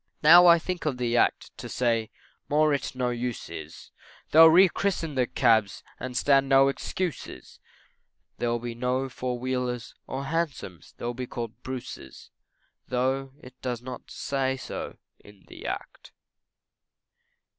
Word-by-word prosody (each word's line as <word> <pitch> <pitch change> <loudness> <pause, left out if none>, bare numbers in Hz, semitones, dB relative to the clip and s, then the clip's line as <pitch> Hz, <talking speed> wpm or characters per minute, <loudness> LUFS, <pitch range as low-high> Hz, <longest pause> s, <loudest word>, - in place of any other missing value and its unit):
Now 175 +3 +9
I 170 0 +8
think 175 -1 -4
of 135 -4 -1
the 120 -1 -1
Act - - +1
to - - -7
say 115 -3 0 0.4
more 150 +1 +3
it 140 - -3
no 125 -1 -1
use 120 -4 -4
is, 80 -2 -9 0.4
They'll 160 +1 +9
rechristen 180 -1 +3
the 130 -2 +1
cabs, 110 -6 +2 0.2
& 130 0 -5
stand 135 +1 +3
no 135 0 +6
excuses, 170 +3 -5 0.8
There'll 120 0 0
be 120 0 -5
no 125 +3 -1
four 125 0 -4
wheelers 125 -2 -3
or 135 +1 -4
hansoms, 140 - -4
they'll 120 - -4
all - - -3
be 125 +1 -5
called 115 0 -6
Bruce's, 130 - -8 0.6
Tho' 130 +2 -1
it 125 - -12
does 125 -2 -4
not 130 0 -8
say 135 -1 -2
so - - -7 0.2
in 100 -2 -18
the - - -9
act. - - -7
130 Hz, 145 wpm, -26 LUFS, 120-140 Hz, 0.8 s, Now